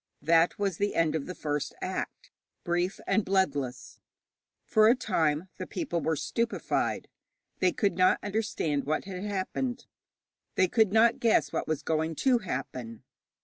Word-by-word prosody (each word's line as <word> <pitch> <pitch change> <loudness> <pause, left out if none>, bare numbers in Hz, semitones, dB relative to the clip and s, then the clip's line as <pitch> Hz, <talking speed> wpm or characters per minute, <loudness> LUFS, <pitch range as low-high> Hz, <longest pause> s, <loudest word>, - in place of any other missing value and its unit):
That 165 +2 +4
was 195 -4 -1
the 205 0 -1
end 165 -2 +2
of 155 -3 -3
the 180 - -6
first 150 -1 -3
act, - - -5 0.3
brief 175 +2 -1
and 220 - +2
bloodless. 145 -10 -1 0.7
For 215 0 +5
a 235 - +6
time 160 - 0
the 185 - -5
people 220 - -2
were 160 +1 0
stupefied. 230 - -1 0.5
They 185 - +3
could 200 +1 +1
not 185 - +5
understand 200 -9 -1
what 155 +5 -1
had 190 -1 -6
happened; 235 +5 -3 0.7
they 185 - +4
could 220 0 +3
not 225 +2 +4
guess 230 -2 +2
what - - -2
was 155 -2 -2
going 160 0 -1
to 255 - +3
happen. 125 - -5
185 Hz, 150 wpm, -29 LUFS, 155-215 Hz, 0.7 s, a